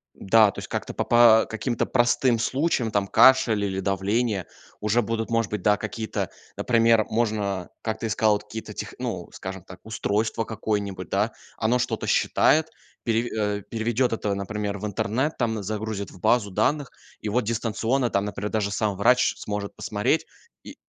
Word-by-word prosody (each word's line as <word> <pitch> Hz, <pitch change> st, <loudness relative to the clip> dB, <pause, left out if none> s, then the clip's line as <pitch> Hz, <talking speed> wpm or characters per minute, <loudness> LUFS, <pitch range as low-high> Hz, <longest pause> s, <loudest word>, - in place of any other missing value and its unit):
Да, 110 Hz, +1 st, +4 dB
то -, -, -8 dB
есть -, -, -7 dB
как-то -, -, -4 dB
по -, -, -2 dB
по 120 Hz, -2 st, +6 dB
каким-то 110 Hz, +2 st, -2 dB
простым 120 Hz, 0 st, +2 dB
случаям, 130 Hz, -2 st, 0 dB
там, 100 Hz, -1 st, 0 dB
кашель 115 Hz, -4 st, +5 dB
или 95 Hz, -1 st, -2 dB
давление 100 Hz, +1 st, 0 dB, 0.3 s
уже 105 Hz, +3 st, +2 dB
будут, 115 Hz, +1 st, -3 dB
может 115 Hz, -2 st, +1 dB
быть, 105 Hz, -3 st, -4 dB
да, 105 Hz, -, +4 dB
какие-то, 110 Hz, +2 st, -4 dB, 0.3 s
например 115 Hz, -2 st, +3 dB
можно, 105 Hz, -5 st, -1 dB
как 110 Hz, -1 st, -2 dB
ты -, -, -4 dB
и -, -, -1 dB
сказал, 110 Hz, 0 st, +3 dB
вот 105 Hz, 0 st, -2 dB
какие-то 110 Hz, +1 st, -8 dB
тех -, -, -6 dB
ну, -, -, -4 dB
скажем 95 Hz, -1 st, -7 dB
так, 90 Hz, 0 st, -12 dB
устройство 110 Hz, +1 st, -1 dB
какое-нибудь, 100 Hz, -4 st, -3 dB
да, 105 Hz, +3 st, +1 dB, 0.3 s
оно 120 Hz, +3 st, +1 dB
что-то -, -, -2 dB
считает, 160 Hz, +1 st, +3 dB, 0.3 s
переве 115 Hz, +1 st, 0 dB
э, 105 Hz, -1 st, -1 dB
переведет 115 Hz, +2 st, 0 dB
это, 105 Hz, -3 st, -1 dB
например, 100 Hz, 0 st, -3 dB
в 105 Hz, -, -6 dB
интернет, 115 Hz, +9 st, -1 dB
там, 110 Hz, -4 st, -1 dB
загрузит 105 Hz, 0 st, -4 dB
в -, -, -15 dB
базу 105 Hz, +2 st, +2 dB
данных, 135 Hz, +8 st, 0 dB, 0.3 s
и 105 Hz, -, -4 dB
вот 125 Hz, +3 st, +1 dB
дистанционно 115 Hz, +3 st, 0 dB
там, 100 Hz, 0 st, +1 dB
например, 105 Hz, 0 st, -4 dB
даже 105 Hz, -2 st, 0 dB
сам 105 Hz, -1 st, -1 dB
врач 125 Hz, +6 st, +3 dB
сможет 105 Hz, -1 st, -5 dB
посмотреть 105 Hz, +9 st, 0 dB, 0.4 s
и -, -, -10 dB
110 Hz, 170 wpm, -25 LUFS, 100-115 Hz, 0.4 s, по